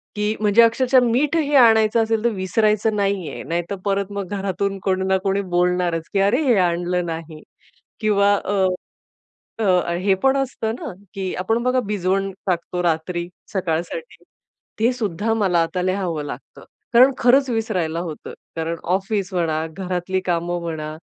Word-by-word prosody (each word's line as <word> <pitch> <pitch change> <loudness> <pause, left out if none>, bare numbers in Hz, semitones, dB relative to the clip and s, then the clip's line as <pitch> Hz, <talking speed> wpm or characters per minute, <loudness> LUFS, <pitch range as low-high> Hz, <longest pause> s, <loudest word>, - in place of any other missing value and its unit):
की 210 +1 0
म्हणजे 210 +2 +5
अक्षरशः 255 +3 +4
मीठ 260 +7 +1
हे 295 -2 +1
आणायचं 225 -2 +5
असेल 225 0 -1
तर 235 - +3
विसरायचं 210 +3 +1
नाही 195 -5 -1
आहे, - - -7
नाहीतर 170 +5 -3
परत 200 0 0
मग 200 -2 -4
घरातून 195 +1 -2
कोणी 190 -1 0
ना 190 0 +3
कोणी 195 0 +1
बोलणारच, 175 -2 +1
की 200 - +2
अरे, 205 +9 +3
हे 250 -5 +4
आणलं 175 0 +1
नाही 160 -2 -6 0.6
किंवा 205 -2 +3
अ, 195 -1 0 1.0
अ, 180 -3 +2
हे 190 +2 +2
पण 270 0 +4
असतं 245 -4 -2
ना, - - -6 0.2
की 190 -2 -3
आपण 225 +5 0
बघा 255 +1 +2
भिजवण 195 -1 0 0.2
टाकतो 180 0 -1
रात्री 170 +1 -1 0.3
सकाळसाठी, 185 - -3 0.6
ते 235 +3 +3
सुद्धा 215 -2 -1
मला 195 -6 +2
आता 180 +2 -3
लिहावं 180 -5 -1
लागतं. 135 -2 -9 0.3
कारण 255 +3 +7
खरंच 260 +2 +4
विसरायला 185 -8 -1
होतं, 165 -3 -6 0.2
कारण 165 +1 -2 0.2
ऑफिस 195 0 -2
म्हणा, 160 -3 0
घरातली 185 +1 -2
कामं 175 0 -1
म्हणा, 155 -2 -5
195 Hz, 155 wpm, -21 LUFS, 175-220 Hz, 1.0 s, कारण